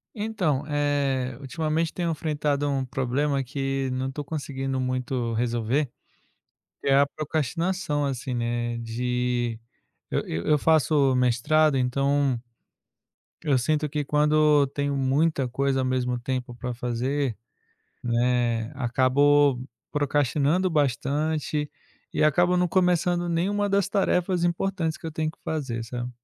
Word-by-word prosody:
Então, 190 -10 -1
eh, 140 -4 0
ultimamente 155 +4 -1
tenho 170 -2 -1
enfrentado 145 -2 -1
um 135 -1 0
problema 135 +2 0
que 135 0 -2
não 130 +1 -2
estou 145 +2 -6
conseguindo 135 -3 -3
muito 130 -2 -2
resolver. 120 +4 0 0.9
Que - - -5
é 135 - +5
a 140 - +5
procrastinação 155 +2 -2
assim, 130 -1 -3
né, 120 0 -1
de 120 0 -1 0.5
eu - - 0
eu 80 +1 -3
eu 150 - +5
faço 145 -2 +3
mestrado, 130 +5 +3
então 135 0 +1 1.0
eu 145 -5 +3
sinto 150 +4 0
que 150 0 -2
quando 150 0 +4
tenho 140 +1 -2
muita 140 +1 +1
coisa 135 +2 0
ao - - 0
mesmo 125 -1 0
tempo 125 0 -4
para 125 0 -4
fazer, 125 +1 -2 0.6
né, 120 -1 +1
acabo 130 +2 +3 0.3
procrastinando 145 +4 +1
bastante 150 +1 0 0.4
e - - +1
acabo 175 +4 +4
não 180 0 +2
começando 175 -1 +2
nenhuma 200 +5 0
das 200 -1 +1
tarefas 180 -3 +1
importantes 175 -2 -1
que - - -12
eu 160 - -4
tenho 155 0 -1
que - - -14
fazer, 130 -7 -3
sabe. 120 +1 -5
140 Hz, 130 wpm, -25 LUFS, 125-155 Hz, 1.0 s, é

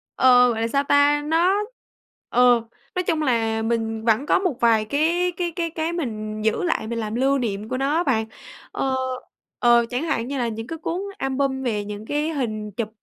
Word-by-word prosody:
Ờ, 250 -1 +6
gọi 225 -1 -3
là 230 - +1
sao 280 +4 +1
ta, 285 +1 +4
nó, 335 +5 +3 0.8
ờ, 245 -1 +5 0.3
nói 365 - 0
chung 325 -3 0
là 225 -5 +1
mình 225 -1 -2
vẫn 230 +4 +2
có - - +3
một 360 -9 -1
vài 225 -2 +3
cái 330 +9 +1
cái 350 -1 -1
cái 335 -2 -1
cái 320 +1 -3
mình 215 -9 -4
giữ 220 - +1
lại 330 -10 -1
mình 230 0 -3
làm 215 0 -3
lưu 270 +3 +2
niệm 215 -4 -3
của 255 - -2
nó 275 +2 0
á 340 - +2
bạn. 225 -7 +1 0.5
Ờ, 265 -1 -1 0.6
ờ, 240 -1 +5
chẳng 250 +5 -2
hạn 255 -8 -1
như 280 - -3
là 245 -2 0
những 225 0 -5
cái 325 - -5
cuốn 335 +3 -3 0.2
album 270 0 -1
về 210 -5 -1
những 210 +1 -7
cái 295 +5 -1
hình 215 -8 -3
chụp, 215 +2 -4
250 Hz, 205 wpm, -23 LUFS, 225-300 Hz, 0.8 s, Ờ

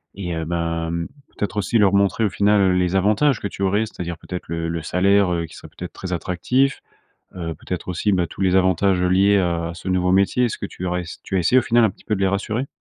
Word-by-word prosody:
et 90 -4 -4
heu, 80 - -3
bah 85 0 -2
mmh, 85 0 -2 0.3
peut-être 105 0 -3
aussi 105 +3 +1
leur 100 -2 +5
montrer 100 +3 +2
au 105 - +1
final 100 -2 +3
les 90 0 +1
avantages 105 +8 +3
que - - -3
tu 100 - -6
aurais, 100 +3 +2
c'est - - -17
à - - -1
dire, 85 -1 -5
peut-être, 90 -1 -6
le 85 0 -3
le 85 -1 -3
salaire, 95 +2 +2
heu, 85 -1 -1
qui 80 - -14
serait - - -11
peut-être - - -8
très 95 -1 -5
attractif. 125 +11 0 0.6
Heu, 80 -2 -4
peut-être, 90 - -6
aussi, 90 +4 0
bah, 90 -2 +1
tous 80 - -12
les 95 -1 +2
avantages 95 0 +2
liés 95 +3 +4
à 85 -2 -1
ce 90 - -12
nouveau 90 0 +1
métier. 100 +6 +3
Est - - 0
ce - - -5
que - - -4
tu 90 - -8
aurais 90 0 -1
ess 85 - -10
tu 95 - -3
as - - +3
essayé 90 +9 +4
au - - -4
final 120 0 +3
un 110 - +3
petit - - -20
peu 105 - 0
de - - -5
les 95 - +3
rassurer? 105 +6 -2
95 Hz, 265 wpm, -21 LUFS, 85-100 Hz, 0.6 s, leur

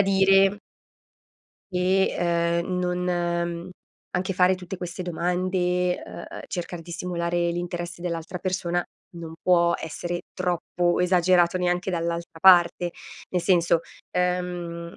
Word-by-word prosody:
dire 195 0 +4 1.1
che, 185 +1 +2 0.5
uhm, 180 +1 -2
non, 180 0 -1
uhm, 170 0 -1 0.4
anche 185 +1 -2
fare 180 +1 +4
tutte 180 +1 -7
queste 175 0 -6
domande, 180 +1 0
uhm, - - -8
uhm, - - -7
cercar 175 -1 -5
di 175 - -12
simulare 170 -1 -1
l'interesse 175 0 -4
dell'altra 170 0 -4
persona, 175 -1 -1 0.3
non 165 -1 -7
può 170 -1 +4
essere 175 +2 -4
troppo 175 -1 0
esagerato 180 0 +3
neanche 180 +1 0
dall'altra 170 -1 -3
parte, 175 -1 +6 0.4
nel 180 - 0
senso, 170 -2 +3 0.3
uhm, 180 -2 -2
175 Hz, 115 wpm, -25 LUFS, 170-180 Hz, 1.1 s, parte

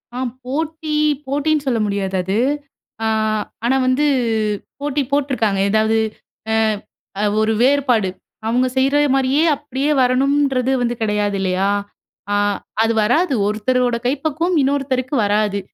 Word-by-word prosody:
ஆ. - - -4 0.3
போட்டி, 310 +3 -3 0.3
போட்டின்னு 290 +2 0
சொல்ல 240 -3 +1
முடியாது 200 -2 -2
அது. 190 +4 -1 0.7
ஆ - - +1 0.6
ஆனா 255 +3 +3
வந்து 260 +4 +2 0.7
போட்டி 290 0 -1
போட்டுருக்காங்க. 255 -8 0
எதாவது 220 +1 +2 0.5
அ - - +1 0.7
அ - - 0 0.2
ஒரு 220 +1 +2
வேறுபாடு. 255 -6 +3 0.4
அவங்க 250 +3 +2
செய்ற 270 +2 +2 0.2
மாரியே 270 +3 +2
அப்படியே 280 +1 -2
வரணுன்றது 265 0 +2
வந்து 240 0 0
கிடையாது 210 -2 0
இல்லையா? 190 +1 +1 0.6
ஆ - - +1 0.5
அது 225 0 +2
வராது. 290 +8 +2
ஒருத்தரோட 245 +3 +1
கைப்பக்குவம் 315 +6 -1
இன்னொருத்தருக்கு 270 -1 0
வராது! 205 0 +1
255 Hz, 120 wpm, -19 LUFS, 220-285 Hz, 0.7 s, ஆனா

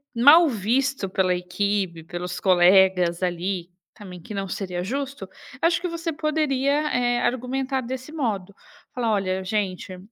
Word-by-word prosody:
mal 295 +8 +7
visto 240 0 0
pela 185 -1 +1
equipe, 180 -1 -2
pelos 175 +1 -6
colegas 185 -1 +4
ali, 180 0 -2 0.2
também, 185 -5 -11
que 210 - -9
não 195 -1 -3
seria 180 -3 -4
justo, 270 -2 -4 0.3
acho 335 +1 +3
que 360 - -2
você 335 0 -3
poderia, 300 -1 0
eh, 245 -1 +1
argumentar 260 +2 -1
desse 260 +4 -6
modo, 210 - -3 0.4
falar: 235 -3 -1
"Olha, 190 -2 -1
gente, 185 -2 -3
205 Hz, 135 wpm, -24 LUFS, 185-270 Hz, 0.4 s, mal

